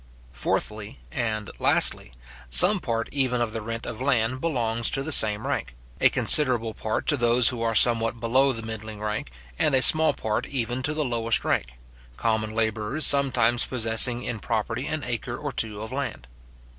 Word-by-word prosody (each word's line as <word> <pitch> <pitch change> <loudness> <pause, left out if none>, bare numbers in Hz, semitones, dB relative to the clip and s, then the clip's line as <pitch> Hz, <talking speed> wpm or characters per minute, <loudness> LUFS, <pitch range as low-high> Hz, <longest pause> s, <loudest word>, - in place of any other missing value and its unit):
Fourthly 105 - -4
and 110 - -4
lastly, - - +3 0.4
some 185 - +6
part 115 -6 -4
even 130 -3 -2
of 115 -2 -3
the 115 - -5
rent 115 +2 -7
of 110 - -8
land 130 -1 -1
belongs 115 -7 -1
to 135 - -2
the 160 - -6
same 110 -5 +4
rank; - - -5 0.2
a - - +4
considerable 120 -6 +6
part 110 0 -5
to 145 - +2
those 120 -1 +2
who 120 -2 -7
are 115 -1 -2
somewhat 115 +1 +2
below 130 +4 +1
the 115 -3 -6
middling 110 -1 -8
rank, 105 - -5 0.3
and 145 - +1
a 130 - +3
small 155 0 +4
part 110 +4 -4
even 125 -1 -4
to 150 +4 -2
the 155 -1 -2
lowest 115 -2 -1
rank; - - -1 0.5
common 110 -1 -2
labourers 110 +6 -1
sometimes 125 -4 +2
possessing 120 0 +3
in 115 - -6
property 115 +5 -4
an 155 -2 -4
acre 120 0 -6
or 145 -1 -6
two 110 -4 -3
of 110 - -10
land. 135 - -6
115 Hz, 175 wpm, -23 LUFS, 110-130 Hz, 0.5 s, some